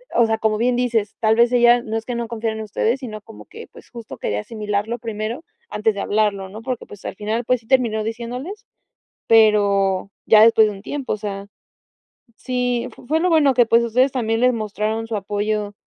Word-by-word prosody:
o 235 - +5
sea, 225 0 -1
como 215 -1 +1
bien 245 +2 +1
dices, 235 -4 -1
tal 220 -1 +3
vez 235 +1 +4
ella 240 0 +5
no 220 -1 -5
es 225 0 -3
que 245 - -4
no 235 0 -3
confiara 225 -1 -3
en 220 - -5
ustedes, 220 +4 -1
sino, 215 -4 -7
como 225 +1 -14
que, - - -12
pues, - - -16
justo 235 -2 -9
quería 105 - -2
asimilarlo 210 - -3
primero 225 +5 -5 0.3
antes 220 - 0
de 200 - -5
hablarlo, 205 -2 0
¿no? 215 +3 -9
Porque, 255 -1 -4
pues, 205 - -13
al - - -5
final, 220 +4 -3
pues, 250 0 +1
sí 220 - -26
terminó 235 -4 +2
diciéndoles 245 - -6 0.6
pero 200 -3 +3 0.2
ya 215 -1 +7
después 225 -1 +6
de 210 - -4
un 195 - -12
tiempo, 275 +4 -3
o - - -4
sea, 200 -1 -6 0.9
sí 250 -1 -2
f - - -16
fue 315 +4 +1
lo 360 +2 +1
bueno 305 -5 +4
que, 240 -1 +5
pues, 230 +1 +3
ustedes 255 +4 +2
también 225 -3 -1
les 250 0 +4
mostraron 220 0 -3
su 225 - -3
apoyo, 205 +1 -2
225 Hz, 210 wpm, -20 LUFS, 210-240 Hz, 0.9 s, ya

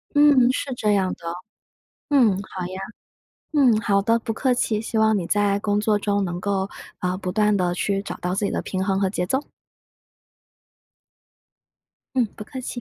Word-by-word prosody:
嗯， 285 -4 +6
是 260 0 -3
这 215 -3 +1
样 190 -2 +1
的。 - - -10 0.9
嗯， 260 -6 +5 0.2
好 185 -1 -4
呀。 185 +1 -6 0.7
嗯， 260 -7 +5
好 200 -1 +2
的， 230 +3 +3
不 225 - -4
客 255 +3 +1
气， 220 -3 0
希 225 0 -3
望 220 -1 +4
你 175 -3 -3
在 205 0 +2
工 205 0 0
作 210 0 +2
中 200 -1 0
能 175 -1 -3
够， 195 0 -1 0.3
呃， 180 0 -1
不 185 -1 -4
断 210 +1 +2
地 180 -2 +1
去 195 +2 -1
找 180 -3 -6
到 180 +1 -2
自 205 +2 0
己 - - -1
的 - - -1
平 190 -1 -3
衡 195 0 0
和 195 - +1
节 180 -2 -2
奏。 265 +9 0 2.7
嗯， 250 -2 +3
不 - - -7
客 260 +5 -8
气。 - - -6
205 Hz, 195 characters per minute, -23 LUFS, 190-225 Hz, 2.7 s, 嗯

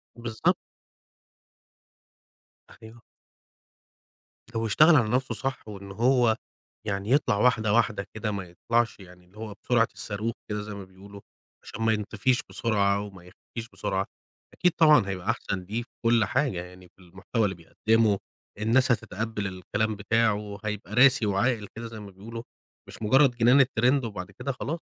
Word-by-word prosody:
بالضبط. 120 -2 0 2.3
أيوه. 115 +1 -13 1.5
لو 115 - 0
اشتغل 155 +9 +6
على 115 -5 +3
نَفْسه 125 -2 0
صح، 130 +2 -4
وإن 100 -2 -9
هو 120 +1 +3 0.5
يعني 100 +3 -2
يطلَع 135 -7 +3
واحدة 110 -3 +3
واحدة 110 -4 +2
كده 110 -1 -3
ما 100 -2 -3
يطلَعش 115 +7 -1
يعني 90 -1 -15
اللي 95 +4 -22
هو 110 -1 -6
بسرعة 120 -2 +3
الصاروخ 110 +2 -3 0.2
كده 105 0 -2
زَي 105 0 -7
ما 100 -1 -7
بيقولوا، 100 +2 -13 0.4
عشان 115 - -8
ما 110 0 +3
ينطفيش 110 +5 0
بسرعة 100 -3 +1
وما 95 -3 -10
يختفيش 115 +5 -10
بسرعة، 95 0 -1 0.5
أكيد 180 - +2
طبعًا 150 -11 +6
هيبقى 95 -2 -4
أحسَن 95 - -1
ليه 110 +6 -3
في - - -24 0.2
كُلّ 115 -2 +4
حاجة 130 -10 0
يعني 90 0 -13
في - - -22
المحتوى 95 +5 -3
اللي 95 -2 -1
بيقدمه، 110 +5 +1 0.4
الناس 125 +4 +3
هتتقبل 110 -2 -2
الكلام 105 +4 -2
بتاعه، 110 +2 +2
وهيبقى 105 -1 -5
راسي 130 0 +5
وعاقل 105 +2 +1
كده 115 +1 -6
زَي 110 -1 -9
ما 100 -1 -10
بيقولوا 115 +5 -8 0.4
مش - - -12
مجرد 130 +5 +5
جنان 125 +4 +6
الtrend 130 +2 +2
وبعد 100 -5 -6
كده 140 - -4
خلاص 150 +5 -4
110 Hz, 150 wpm, -27 LUFS, 100-120 Hz, 2.3 s, اشتغل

